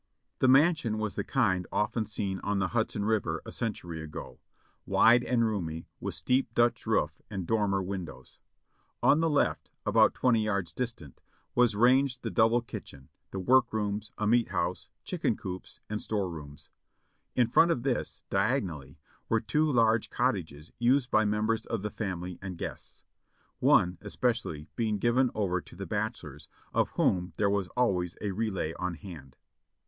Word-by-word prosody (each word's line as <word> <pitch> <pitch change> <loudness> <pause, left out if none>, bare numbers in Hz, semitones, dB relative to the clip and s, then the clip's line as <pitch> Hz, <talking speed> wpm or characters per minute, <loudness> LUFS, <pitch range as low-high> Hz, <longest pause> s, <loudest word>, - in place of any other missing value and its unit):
The 130 - +4
mansion 135 -4 +4
was 110 -2 -2
the - - -2
kind 90 -1 +1
often 110 +1 0
seen 100 -3 -3
on 100 0 -1
the 95 -2 0
Hudson 110 -2 -1
River 110 -2 0
a - - -7
century 90 -8 -4
ago; 80 -1 -8 0.4
wide 120 +2 +5
and 120 -2 +2
roomy, 85 -7 -3
with - - -4
steep 125 -2 +1
Dutch 120 0 +2
roof - - 0
and 95 -3 -4
dormer 100 -2 +1
windows. 95 -3 -7 0.6
On 150 - +5
the 165 0 +2
left, 145 - +1 0.2
about - - +4
twenty 115 -4 +3
yards 100 -4 -1
distant, 115 - -5 0.3
was 120 -3 +3
ranged 125 +3 +3
the - - -3
double 115 +2 +4
kitchen, 70 -11 -9 0.2
the - - -6
work 120 +6 +4
rooms, 105 -1 -2
a 105 - -1
meat 120 +2 +3
house, - - -2
chicken - - -1
coops, 90 0 -8
and 105 0 -3
store 100 -4 -2
rooms. 75 -2 -10 0.6
In 125 - +4
front 165 +8 +5
of 125 -8 0
this, 135 -2 -2
diagonally, 95 - -1 0.3
were 115 - +3
two 150 +8 +1
large 115 -3 +3
cot - - +2
tages 75 +3 -8
used 125 +2 +2
by 110 0 +4
members 105 +2 0
of 110 -4 -3
the 105 - -3
family 90 -4 -4
and 95 -3 -6
guests; - - -7 0.6
one, 90 0 +4
especially, 105 -8 -2
being 110 -3 0
given 120 +4 +2
over 90 -4 0
to - - -15
the 100 +2 -6
bachelors, 90 - -4 0.3
of - - +2
whom 90 0 +1
there 100 -1 +2
was 100 -2 0
always 90 -8 +1
a 105 - -2
relay 95 -6 -2
on 90 -2 -2
hand. 80 -9 -11
105 Hz, 165 wpm, -29 LUFS, 90-120 Hz, 0.6 s, wide